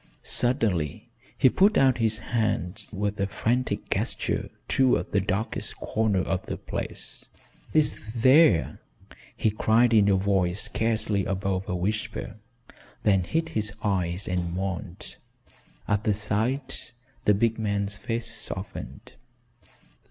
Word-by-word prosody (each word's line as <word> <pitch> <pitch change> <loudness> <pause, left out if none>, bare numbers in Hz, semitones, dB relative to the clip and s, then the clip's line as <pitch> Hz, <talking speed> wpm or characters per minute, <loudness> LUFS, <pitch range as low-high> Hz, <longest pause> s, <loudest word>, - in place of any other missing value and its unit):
Suddenly 105 - +1 0.3
he - - +5
put 200 - +4
out 130 -2 +4
his 110 -1 +2 0.2
hand 105 -5 -1
with 105 0 -2
a 100 - +1
frantic 120 +5 -1
gesture - - -1 0.2
toward 130 -2 +2
the 100 - +3
darkest 100 +3 -2
corner 110 -4 0
of 95 0 -2
the - - -3
place, - - -6 0.5
"It's 155 -1 +3 0.2
there," 125 - +5 0.6
he 110 - +2
cried 115 +3 +3
in 105 -2 +5
a 100 - +4
voice 95 -1 +1
scarcely 110 -3 0
above 95 -1 -2
a 90 - -1
whisper, 105 +4 -3 0.7
then 95 -4 +3
hid 160 - -1
his 105 -7 -1
eyes 95 -2 -1
and 90 -1 -2
moaned. 95 -1 -5 0.7
At 105 0 +1
the 105 -3 +2
sight, 115 +6 -2 0.3
the 105 - +5
big 115 +2 +1
man's 100 -2 -1
face 115 +3 -3
softened. - - -6
105 Hz, 125 wpm, -26 LUFS, 95-115 Hz, 0.7 s, he